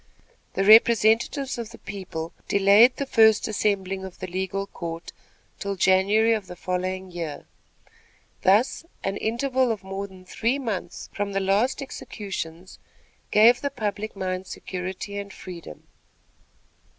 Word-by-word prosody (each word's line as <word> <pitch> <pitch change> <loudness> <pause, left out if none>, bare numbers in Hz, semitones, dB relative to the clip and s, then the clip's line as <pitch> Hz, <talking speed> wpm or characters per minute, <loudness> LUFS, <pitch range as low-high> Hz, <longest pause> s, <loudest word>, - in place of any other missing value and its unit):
The 195 - +1
representatives 230 +5 +5
of 230 -2 -5
the 230 - -12
people 180 -5 -6
delayed 200 +5 +6
the 280 - -2
first 220 -4 +4
assembling 195 -3 -1
of 190 -2 -8
the - - -5
legal 190 +2 -3
court 170 -3 -7 0.5
till 200 0 -3
January 195 +5 +4
of 210 -4 -3
the 180 - -8
following 185 +1 -3
year. 165 -4 -5 1.0
Thus 210 - +3 0.2
an 195 +1 -1
interval 255 +2 0
of 215 -3 -4
more 195 +1 -5
than 185 -1 -15
three 230 +7 0
months 225 -9 -4
from 205 -1 -3
the 195 - +1
last 205 +8 +1
executions 190 -8 -7 0.5
gave 230 +3 +6
the 280 - -1
public 215 -4 -4
mind 185 -1 -3
security 190 +2 -5
and 200 0 -7
freedom. 170 - -10
200 Hz, 135 wpm, -25 LUFS, 185-220 Hz, 1.0 s, delayed